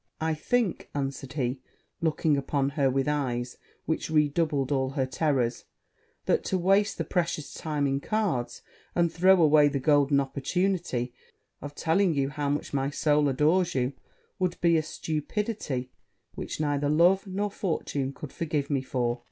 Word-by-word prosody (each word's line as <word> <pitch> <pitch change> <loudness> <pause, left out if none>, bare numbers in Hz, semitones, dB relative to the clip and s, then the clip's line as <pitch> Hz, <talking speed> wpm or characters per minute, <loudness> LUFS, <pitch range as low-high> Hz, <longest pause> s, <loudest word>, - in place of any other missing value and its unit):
'I 160 0 0
think,' 215 +5 -1
answered 135 -1 -3
he, 130 -2 -2 0.4
looking 155 -1 +2
upon 140 0 0
her 140 -1 +1
with 135 +1 0
eyes 125 -4 -1 0.3
which 160 - -2
redoubled 150 -2 +1
all 130 -2 +1
her 135 -1 -1
terrors, 130 -3 0 0.6
'that - - +2
to 190 - 0
waste 195 +3 +2
the - - -1
precious 170 -4 -2
time 150 -3 -2
in 135 0 +1
cards, 140 - -2 0.3
and 170 -1 +2
throw 185 +2 +5
away 150 -2 +6
the 145 -1 -1
golden 145 0 +3
opportunity 140 -2 -1 0.5
of 145 0 -7
telling 165 +2 +2
you 135 -1 +1
how 145 0 -2
much 145 +1 -2
my 135 0 0
soul 145 0 +2
adores 155 +6 +2
you, 130 +1 0 0.5
would 180 -1 -1
be 170 -1 +4
a 160 - +3
stupidity 155 - -3 0.4
which - - -6
neither 145 -1 0
love 175 +6 +4
nor 200 +2 -2
fortune 150 -9 -2
could 140 +1 -9
forgive 150 -4 -2
me 140 -2 +1
for.' 125 -2 -1
145 Hz, 155 wpm, -27 LUFS, 135-170 Hz, 0.6 s, away